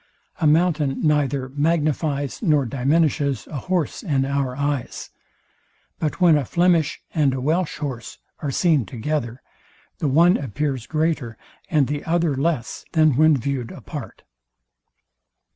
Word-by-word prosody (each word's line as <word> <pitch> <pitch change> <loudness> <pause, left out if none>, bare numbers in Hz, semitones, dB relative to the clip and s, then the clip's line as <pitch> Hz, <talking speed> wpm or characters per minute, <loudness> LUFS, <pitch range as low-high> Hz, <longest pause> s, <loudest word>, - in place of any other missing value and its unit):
A 155 - +2
mountain 150 -3 +2
neither 140 -3 +1
magnifies 145 -1 -1
nor 150 - +2
diminishes 140 - +1
a 150 - -7
horse 175 +4 -2
in 140 - 0
our 135 -2 -1
eyes; 140 -3 -3 0.9
but 155 +2 -2
when 170 -4 +5
a - - -2
Flemish 170 +1 +2
and 145 -5 +2
a - - -3
Welsh 160 +6 0
horse 125 -6 -6 0.2
are 145 - -3
seen 155 -1 +2
together, 125 0 -3 0.6
the 150 - 0
one 170 +6 +5
appears 135 -1 -3
greater 155 -7 -1 0.3
and 150 -4 +3
the 145 +2 -3
other 165 -3 +1
less, 140 -2 -2
than 155 -5 +4
when 155 +1 +5
viewed 130 -2 -3
apart. - - -9
145 Hz, 130 wpm, -22 LUFS, 135-160 Hz, 0.9 s, when